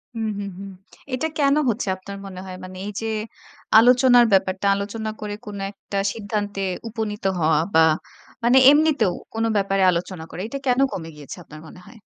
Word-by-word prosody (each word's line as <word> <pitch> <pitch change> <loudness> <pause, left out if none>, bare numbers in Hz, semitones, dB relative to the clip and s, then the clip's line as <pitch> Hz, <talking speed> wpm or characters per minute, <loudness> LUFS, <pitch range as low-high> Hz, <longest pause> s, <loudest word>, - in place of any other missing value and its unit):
হুম, 225 -1 -2
হুম, 200 - -4
হুম। 200 - -7 0.4
এটা 255 +5 0
কেন 280 0 +4
হচ্ছে 225 -2 -2
আপনার 200 +1 -9
মনে 185 -2 -8
হয়? 185 - -7
মানে 185 0 -9
এই 210 - -4
যে, 225 - -3 0.7
আলোচনার 245 0 +6
ব্যাপারটা। 190 0 +2
আলোচনা 215 +2 -4
করে 210 -1 -4
কোন 205 -1 -7
একটা 200 0 -7 0.2
সিদ্ধান্তে 205 -2 -3 0.3
উপনীত 215 -2 -4 0.2
হওয়া 155 -1 +3
বা 160 0 +6 0.6
মানে 245 +2 +5
এমনিতেও 290 - +3 0.2
কোন 225 0 -1
ব্যাপারে 195 -1 +1
আলোচনা 170 -1 -4
করে। 180 - -7
এটা 275 +4 -5
কেন 250 +1 +3
কমে 165 -2 -6
গিয়েছে 145 -2 -10
আপনার 155 +1 -12
মনে 180 - -13
হয়? 240 - -15
205 Hz, 175 wpm, -22 LUFS, 185-230 Hz, 0.7 s, আলোচনার